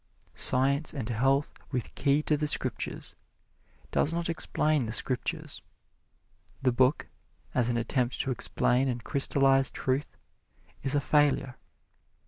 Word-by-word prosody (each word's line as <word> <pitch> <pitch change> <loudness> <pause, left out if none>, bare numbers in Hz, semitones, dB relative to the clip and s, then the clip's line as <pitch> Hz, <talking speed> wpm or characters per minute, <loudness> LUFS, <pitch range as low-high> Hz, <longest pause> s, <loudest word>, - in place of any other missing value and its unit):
"Science 140 +4 +2
and 125 -6 -4
Health 135 +5 +1 0.2
with 125 -4 -3
Key 140 +2 +1
to 155 - +1
the 150 0 -1
Scriptures" - - -3 0.8
does 150 - +2
not 170 0 -2
explain 155 -4 0
the - - -4
Scriptures. 150 +6 -2 1.0
The 130 -1 +2
book, 130 +4 +2 0.5
as 120 -1 +2
an 120 - 0
attempt 120 +1 -1
to 135 - -2
explain 125 +1 +1
and 120 -2 -3
crystallize 135 0 +3
truth, 135 +2 -3 0.6
is 135 +1 0
a 145 - +2
failure. 140 -3 +2
135 Hz, 125 wpm, -28 LUFS, 125-145 Hz, 1.0 s, crystallize